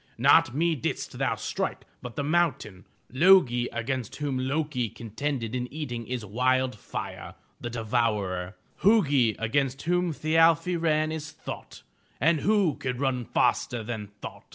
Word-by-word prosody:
Not 120 - +5
me 165 +2 +2
didst 135 - -4
thou - - +1
strike - - -3 0.2
but 125 -2 -8
the 145 - -2
mountain. 140 - 0 0.3
Lo'gi 135 -6 +5
against 120 0 -3
whom 145 -3 -2
Lo'ki 130 -2 -1
contended 115 +1 -4
in 125 -1 -3
eating 125 -7 -5
is 125 -3 -4
wild 130 +4 +1
fire, 105 - -7 0.2
the 120 - -5
devourer; 105 -6 -1 0.3
Hu'gi 145 - +4
against 135 +4 -1
whom 175 +1 +1
Thi 155 +1 -1
al'fi 165 +2 +4
ran 155 -2 +1
is 160 0 -5
thought, - - -9 0.4
and 155 +4 +3
who 200 -5 +2
can 125 -1 -3
run 130 -2 -1
faster 120 +1 +1
than 110 -2 -5
thought? 105 0 -10
130 Hz, 145 wpm, -27 LUFS, 115-155 Hz, 0.4 s, Not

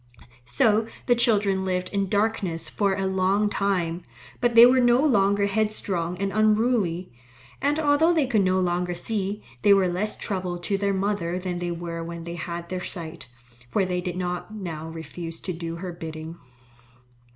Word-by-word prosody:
So 215 - +2 0.2
the 245 - +4
children 205 -5 +2
lived 185 -1 -1
in 200 -2 -1
darkness 200 -6 -1
for 200 -2 +1
a 195 0 -2
long 190 +2 +1
time. 180 -4 -1 0.4
But 240 -1 +1
they 230 +1 +11
were 255 +1 +5
no 245 +3 +4
longer 200 -6 +3
headstrong 200 -4 -1
and 195 +1 -2
unruly, 215 - +1 0.5
and 290 +3 +1
although 305 +2 +4
they 320 -5 +2
could 225 -5 +2
no 185 0 +2
longer 175 0 0
see, 200 +2 -2 0.2
they 200 - +6
were 190 -2 +3
less 185 +5 0
trouble 185 -3 -3
to 175 +3 -2
their 200 0 0
mother 190 -3 -1
than 180 -1 -3
they 175 0 -2
were 170 -1 -4
when 170 0 -7
they 170 0 -6
had 170 0 -5
their 180 0 -4
sight, 165 -4 -5 0.4
for 195 +8 +1
they 180 -1 -1
did 180 0 -4
not 180 +2 -3
now 165 -6 -6
refuse 165 +1 -7
to 185 - -4
do 165 0 -5
her 180 +1 -5
bidding. 160 -1 -7
190 Hz, 175 wpm, -25 LUFS, 175-210 Hz, 0.5 s, they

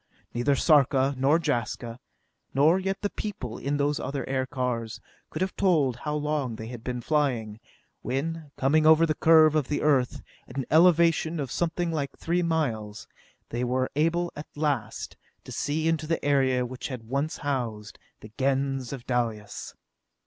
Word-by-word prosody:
Neither 130 +4 +2
Sarka 140 -2 +4
nor 135 +5 +3
Jaska, 120 -4 -2 0.6
nor 155 +7 +5
yet 195 +1 -3
the 205 - 0
people 130 - -5
in 140 +2 -1
those 145 +1 0
other 140 -1 -4
aircars, 125 -4 -2 0.3
could 155 - -2
have 190 - -3
told 150 -10 +2
how 150 +3 -3
long 150 -5 -1
they 110 0 -7
had 120 -2 -8
been 125 -1 -3
flying, 120 -8 0 0.4
when, 150 +5 -3
coming 155 +4 +3
over 160 +1 +7
the 155 - +1
curve 155 0 +6
of 150 -4 +1
the 145 - -1
Earth, 135 -5 +2 0.2
at - - -10
an 135 - -1
elevation 165 0 +4
of 135 -4 -3
something 175 0 -1
like 145 -4 -3
three 175 +2 0
miles, 115 -11 -2 0.4
they 120 +1 -2
were 130 +1 0
able 170 +3 +1
at 150 - -7
last 140 -8 -2 0.3
to - - -11
see 155 +2 -1
into 160 -1 0
the 165 -2 -1
area 130 -3 +2
which 125 +1 -6
had 125 -4 -6
once 140 +5 -1
housed 120 -7 -3 0.2
the 105 - -12
Gens 135 -1 0
of 135 -4 -7
Dalis. 115 -4 -3
140 Hz, 165 wpm, -27 LUFS, 125-155 Hz, 0.6 s, over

